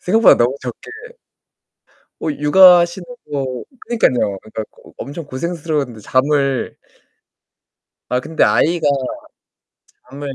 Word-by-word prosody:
생각보다 220 +4 +5
너무 120 +3 +1
적게 125 - -8 1.3
어 160 - -1
육아하시는 175 +4 +5 0.2
거 135 -3 -4 0.2
그러니깐요. 125 - 0
그니까 110 0 -6 0.2
어 - - -15
엄청 145 +3 -7
고생스러운데 145 -4 -4
잠을 135 +3 0 1.3
아 125 - +1
근데 160 +5 0
아이가 165 -1 +2 1.2
잠을 140 0 -7
145 Hz, 245 characters per minute, -18 LUFS, 130-170 Hz, 1.3 s, 생각보다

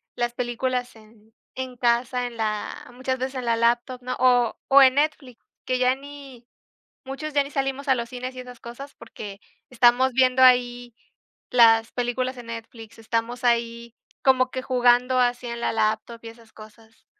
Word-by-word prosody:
las 240 0 -2
películas 245 0 -3
en 220 0 -21 0.2
en 260 -1 -6
casa, 245 +1 0
en 240 -1 -7
la 215 0 -4
muchas 260 +1 -3
veces 260 +1 -4
en 255 - -4
la 230 -1 +2
laptop, 240 +2 0
¿no?, 255 +1 -4
o 245 -2 +3
o 280 0 +7
en 260 -1 +6
Netflix, 285 -5 -2 0.2
que 255 - 0
ya 255 0 +3
ni 275 -3 -12 0.6
muchos 285 +3 -6
ya 285 -1 +3
ni 280 - -11
salimos 275 0 -3
a 265 - +5
los 235 -1 -4
cines 255 +1 -6
y - - -8
esas 250 -1 -11
cosas 270 +4 -10
porque 200 -2 -10 0.3
estamos 250 +1 +3
viendo 255 0 +3
ahí 245 -1 +3 0.6
las 225 -2 +5
películas 255 +1 -2
en 245 - -10
Netflix, 225 -1 -10
estamos 230 +3 -3
ahí 235 -1 -1 0.3
como 255 -1 +3
que 260 - -4
jugando 250 0 +3
así 245 0 0
en 235 0 -5
la - - -1
laptop 220 +1 -1
y 230 - -8
esas 230 -1 -17
cosas, 220 +1 -17
245 Hz, 175 wpm, -24 LUFS, 235-255 Hz, 0.6 s, o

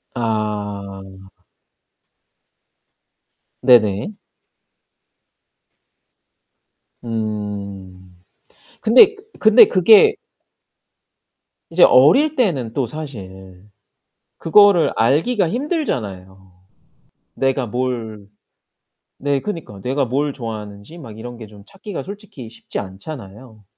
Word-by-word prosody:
아. 100 -4 -5 2.3
네네. 115 - +3 2.9
음. 100 -5 -6 0.6
근데 260 - +6 0.2
근데 220 +2 +7
그게 220 - +5 1.5
이제 170 +2 +3
어릴 280 - +5
때는 140 - -1
또 135 -1 -1
사실 95 -10 -10 1.1
그거를 175 -5 +2
알기가 165 - +1
힘들잖아요. 105 - -4 0.9
내가 135 -1 0
뭘 115 -4 -4 0.9
네 140 -1 -1
그니까 150 - -7
내가 135 +6 -1
뭘 140 +4 -2
좋아하는지 110 +3 -8
막 115 -9 -11
이런 120 +2 -9
게 110 -2 -10
좀 105 -1 -16
찾기가 195 - -8
솔직히 200 - -10
쉽지 115 - -7
않잖아요. 105 +2 -10
115 Hz, 155 characters per minute, -19 LUFS, 100-155 Hz, 2.9 s, 근데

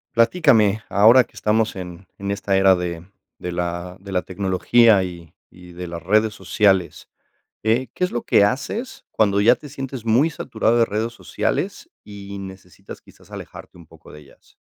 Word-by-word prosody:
Platícame, 115 - +3
ahora 115 +6 +6
que - - -26
estamos 110 +1 0
en 90 -1 -9
en 100 0 -5
esta 100 0 -1
era 95 0 +5
de 85 -2 -5 0.4
de 90 - -5
la 85 +1 -4
de 100 +1 -11
la 90 -1 0
tecnología 100 +4 +3
y 85 -3 -9 0.2
y 90 0 -15
de 90 +1 -7
las 85 -1 -7
redes 110 +3 +2
sociales, 95 -9 0 0.5
eh, 115 +4 +1
¿qué - - -7
es 180 - +1
lo 120 - -3
que - - +3
haces 240 - -3
cuando 100 -2 +2
ya 115 +4 +6
te 145 +4 -13
sientes 135 -3 -7
muy 120 +8 +3
saturado 120 -5 -1
de 115 - +5
redes 110 +2 -3
sociales 120 - -3
y 100 -1 -9
necesitas, 95 -2 -11
quizás, - - -21
alejarte - - -11
un 85 - -15
poco 80 0 -18
de 75 - -12
ellas? 70 - -23
100 Hz, 175 wpm, -21 LUFS, 90-115 Hz, 0.5 s, ahora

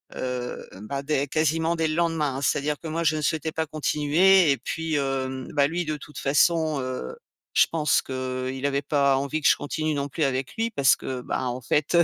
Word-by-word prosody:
heu, 125 -1 -4 0.2
ben 140 +5 -4
dès 140 -1 0
quasiment, 160 +3 +1
dès 165 -1 0
le 155 - -2
lendemain, 160 -5 0
hein, - - -4
c'est-à-dire 145 +1 0
que 165 - -8
moi, 165 +2 -2
je 155 -1 +2
ne - - -2
souhaitais 160 +1 -1
pas 160 +1 -2
continuer 155 +3 +3
et 135 - +1
puis, 160 +2 -3
hem, 130 -2 -2
ben 140 -2 +3
lui 175 +3 -2
de 155 -1 -2
toute 150 +1 -10
façon, 155 +1 +2
heu, 130 - -5 0.4
je - - +6
pense 155 -2 +2
qu'il 130 0 -4
avait 140 0 +1
pas 140 -1 +2
envie 140 +3 -2
que - - +3
je - - +6
continue 155 +1 -2
non 140 -1 -2
plus 155 +3 -2
avec 130 -1 -1
lui 230 +1 0
parce 140 - +4
que, 130 -1 -5
ben 125 - -3
en 125 +1 -3
fait, 145 +4 0
heu, 170 - +7
145 Hz, 220 wpm, -25 LUFS, 135-160 Hz, 0.4 s, heu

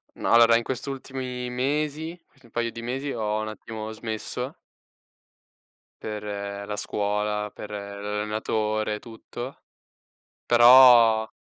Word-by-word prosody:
Ma - - -2
allora 115 0 +7
in 120 - -2
quest' 130 +3 -4
ultimi 130 -2 -5
mesi, 150 +6 -2
quasi - - -29
un 115 - -20
paio 120 0 -1
di 115 0 -8
mesi, 135 +4 -3
ho 110 -3 -1
un 110 - -3
attimo 110 0 -7
smesso 110 -1 -4 1.5
per 105 -1 -5 0.4
la 105 - -4
scuola, 105 0 -1
per 105 - -9
l'allenatore 105 +1 -2
e - - -7
tutto; 120 +3 -9 0.9
però 120 -2 +7
115 Hz, 120 wpm, -25 LUFS, 105-125 Hz, 1.5 s, allora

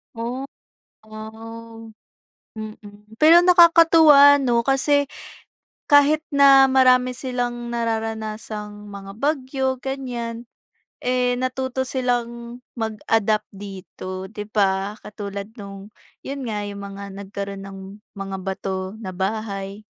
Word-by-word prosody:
Oh, 240 +4 -4 0.6
wow! 225 +1 -10 0.7
Mm, 215 -1 -7 0.4
pero 330 +3 +7
nakakatuwa 330 -5 +7
'no, 240 -4 +1
kasi 280 +2 +2 0.8
kahit 290 +2 +5
na 275 -1 +6
marami 255 -1 +4
silang 245 -2 -3
nararanasang 220 -2 -4
mga 195 0 -9
bagyo, 265 -2 -1
ganyan, 245 -3 -5 0.6
eh, 250 0 +1
natuto 260 +1 -2
silang 245 -2 -3 0.2
mag-adapt 220 -1 0
dito, 190 -1 -8
'di 210 -1 -7
ba, 195 0 +1
katulad 200 0 -7
no'ng, 200 +1 -10 0.3
'yon 275 -2 -5
nga, 210 -2 -3
yung 200 0 -6
mga 200 0 -8
nagkaroon 200 0 -6
ng 195 0 -9 0.4
mga 195 -1 -5
bato 190 +1 -4
na 205 -4 -7
bahay. 195 +1 -4
225 Hz, 100 wpm, -22 LUFS, 200-260 Hz, 0.8 s, pero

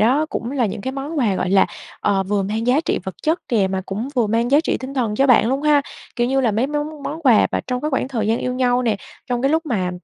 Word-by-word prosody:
đó 265 +8 +3
cũng 235 - -3
là 260 -4 +1
những 205 +1 -5
cái 260 +5 -4
món 285 +3 -4
quà, 215 -7 +2
gọi 180 - -1
là, 195 0 +5 0.3
ờ, 200 -2 +1
vừa 200 +1 0
mang 220 +4 -2
giá 260 +5 +4
trị - - 0
vật 190 - -5
chất 320 +3 +1
kìa, 215 -5 +2
mà 190 0 -2
cũng 215 +7 -4
vừa 240 -3 +2
mang 230 +3 0
giá 285 +2 +5
trị 320 - -1
tinh 265 +1 -6
thần 230 -6 0
cho 270 +5 +3
bạn 245 -3 +5
luôn 270 +3 -1
ha? 295 -1 +4 0.3
Kiểu 240 -1 +1
như 270 +2 +1
là 240 - +2
mấy 230 +5 +1
món 295 0 -4
món 320 +4 -5
quà 245 -7 +5
và - - -1
trong 250 -1 -2
cái 305 - -2
khoảng 265 -1 -1
thời 225 -5 -2
gian 225 +2 +1
yêu 250 - -2
nhau 250 -1 +2
nè, 225 -4 +1 0.3
trong 245 0 -2
cái 270 - +3
lúc 320 +1 +1
mà, 190 -9 -1
250 Hz, 295 wpm, -20 LUFS, 215-275 Hz, 0.3 s, là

